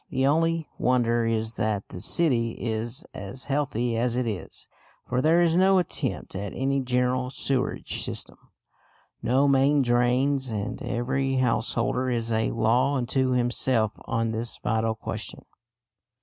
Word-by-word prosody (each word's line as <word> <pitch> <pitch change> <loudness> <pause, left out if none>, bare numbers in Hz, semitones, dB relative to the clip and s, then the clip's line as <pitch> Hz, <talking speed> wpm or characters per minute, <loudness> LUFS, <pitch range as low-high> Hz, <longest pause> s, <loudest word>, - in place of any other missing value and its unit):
The 130 - 0
only 165 +2 +2
wonder 120 -2 +2
is 110 0 -1
that 105 -2 -1
the 90 - -8
city 120 - +1
is 115 +2 -3
as 100 +7 -7
healthy 135 -5 -1
as 120 +1 0
it 125 0 0
is, 105 -5 -6 0.4
for 125 +1 0
there 165 +4 +4
is 165 -1 +2
no 190 +1 +5
attempt 180 - -2
at 100 0 -5
any 135 +1 0
general 125 0 0
sewerage 130 0 -2
system, - - -5 0.8
no 130 +4 +3
main 140 +1 +4
drains, 125 +3 +2
and 105 -2 -4
every 135 +3 -1
householder 125 0 0
is 115 -2 -1
a 110 0 +1
law 120 +5 +2
unto 130 +1 +1
himself 120 -2 +1
on 115 0 -1
this 115 +1 -4
vital 110 0 0
question. 110 - -6
125 Hz, 140 wpm, -26 LUFS, 115-135 Hz, 0.8 s, no